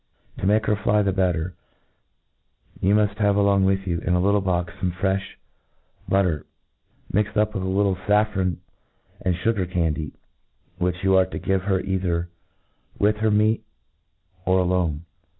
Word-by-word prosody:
To 95 - -1
make 110 +2 +3
her 105 - +2
fly 105 +1 +2
the 100 -1 +1
better, 90 -2 0 1.3
you 100 +3 +3
muft 105 -1 +1
have 105 -1 +3
along 100 -1 +3
with 95 0 +1
you, 85 -3 -1
in 90 +2 0
a - - +2
little 100 +2 +3
box, 90 -3 -1
fome 90 - 0
frefh 95 +2 0 0.9
but 100 0 +4
ter, 80 -6 -1 0.7
mixed 105 +2 0
up 105 0 +2
with 105 - -3
a 95 - -2
little 95 0 +1
faffron 100 -2 +1 0.6
and 90 -2 0
fugar 95 0 -1
can 85 -4 +1
dy, 75 -1 -5 0.7
which 90 +1 -1
you 95 0 +4
arc 95 - +3
to - - -5
give 95 -1 -1
her 95 -2 +1
either 90 -3 -1 0.7
with 105 +1 +2
her 110 +1 +1
meat, 110 +1 +2 0.8
_or 95 0 +4
alone. 85 -3 0
95 Hz, 165 wpm, -23 LUFS, 90-105 Hz, 1.3 s, but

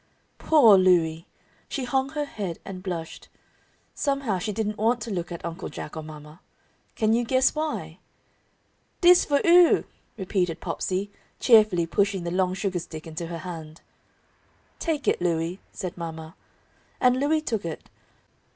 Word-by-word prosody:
Poor 235 -11 +6
Louie! 170 -2 +2 0.4
She 275 - -3
hung 265 +2 0
her 295 -1 -1
head 195 - -5
and 190 -2 -7
blushed. 175 -4 -6 0.6
Somehow 275 -9 -1
she 210 +4 -3
didn't 210 0 -3
want 230 +3 +2
to 225 0 -5
look 175 -2 -3
at 170 -1 -6
Uncle 170 +2 -5
Jack - - -8
or 160 - -4
mama. 150 +1 -11 0.6
Can 220 0 +2
you 240 +1 +2
guess 260 +2 +2
why? 310 0 -4 1.0
"Dis 355 0 +7
for 285 -1 +2
'ou!" 345 0 +6 0.3
repeated 180 -4 -1
Popsey, 195 +2 -3 0.3
cheerfully, 215 -8 +5
pushing 195 +1 0
the 170 - -3
long 185 0 +1
sugar 190 -2 -2
stick 155 -2 -9
into 165 +1 -6
her 170 0 -5
hand. 160 -3 -8 1.0
"Take 310 -4 -2
it, - - +2
Louie," 170 +1 -1
said 185 -3 -6
mama. 160 -2 -7 0.7
And 250 0 +3
Louie 305 +3 +2
took 225 -9 -2
it. 165 -2 -6
190 Hz, 150 wpm, -25 LUFS, 170-245 Hz, 1.0 s, Dis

